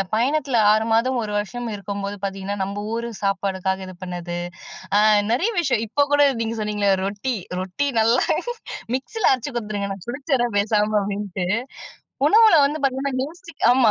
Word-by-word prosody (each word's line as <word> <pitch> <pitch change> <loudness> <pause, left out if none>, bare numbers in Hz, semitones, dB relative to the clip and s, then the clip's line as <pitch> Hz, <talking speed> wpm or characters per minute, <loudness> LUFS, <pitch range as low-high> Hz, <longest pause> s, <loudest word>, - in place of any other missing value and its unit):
பயணத்துல 265 0 +1
6 220 +1 +1
மாதம், 250 +3 +2
1 210 -1 -4
வருஷம் 240 +4 -5
இருக்கும்போது 200 0 -5
பார்த்தீங்கன்னா, 195 +1 -4
நம்ப 200 +1 -4 0.2
ஊரு 235 0 -3
சாப்பாடுக்காக 190 -1 -1
இது 185 - -9
பண்ணது. 175 -1 -5 0.6
அ - - +6 0.3
நெறைய 370 - +1
விஷயம் 260 -8 +1
இப்ப 285 +6 +1
கூட 290 - +5 0.2
நீங்க 225 +1 -3
சொன்னீங்களே 205 -2 +1
ரொட்டி, 210 +5 -2 0.3
"ரொட்டி 190 +10 -2
நல்லா 230 +3 +3 0.7
மிக்ஸியில 430 +11 +1
அரைச்சு 260 +3 -3
குடுத்துருங்க. 210 -3 -3
நான் 190 - -14
குடுச்சிட்ற 265 -2 0
பேசாம." 210 0 +1
அப்டின்ட்டு 195 -2 -3 0.8
உணவுல 440 -3 +7
வந்து 300 +2 -2
பார்த்தீங்கன்னா, 270 0 0
யோசிக் 335 0 -13
ஆமா 245 -3 +5
220 Hz, 145 wpm, -22 LUFS, 200-265 Hz, 0.8 s, உணவுல